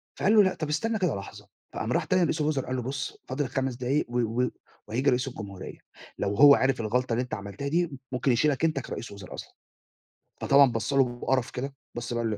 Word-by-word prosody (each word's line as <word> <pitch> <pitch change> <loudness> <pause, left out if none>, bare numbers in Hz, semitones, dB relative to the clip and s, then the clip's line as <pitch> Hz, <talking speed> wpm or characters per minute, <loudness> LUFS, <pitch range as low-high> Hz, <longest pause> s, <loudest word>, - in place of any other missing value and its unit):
فقال 210 +3 +3
له: 210 - +8
"لأ، 185 - +2
طب 155 -2 -4
استنى 220 +8 0
كده 175 - +1
لحظة." 100 - -9 0.3
فقام - - -3
راح - - +2
تاني 185 0 +2
لرئيس 160 -2 0
الوِزَرا 150 -3 0
قال 130 - -2
له: 125 - -1
"بُص 130 0 -4
فاضل 130 +1 -2
5 135 -1 -2
دقايق 130 +4 0
و 120 0 -1 0.2
و 125 - +1 0.4
وهييجي 125 +6 +1
رئيس 125 +2 +1
الجمهورية، 100 -6 -8 0.4
لو 100 +1 -1
هو 140 +4 +9
عرف 130 -3 +1
الغلطة 120 +2 0
اللي 120 - +1
أنت 125 - -9
عملتها 100 +7 -5
دي 170 +1 +1 0.2
ممكن 125 +1 +1
يشيلك 145 +5 +2
أنت 155 -4 +1
كرئيس 120 - -6
الوُزَرا 100 -2 -10
أصلًا." - - -9 0.9
فطبعًا 140 -2 +6
بَص 115 +4 -2
له 135 -1 +5 0.2
بقرف 130 -2 0
كده، 135 +2 -4 0.2
بَص 120 0 -4
بقى 120 0 -1
قال 110 - 0
له 105 - -2
130 Hz, 225 wpm, -27 LUFS, 120-145 Hz, 0.9 s, هو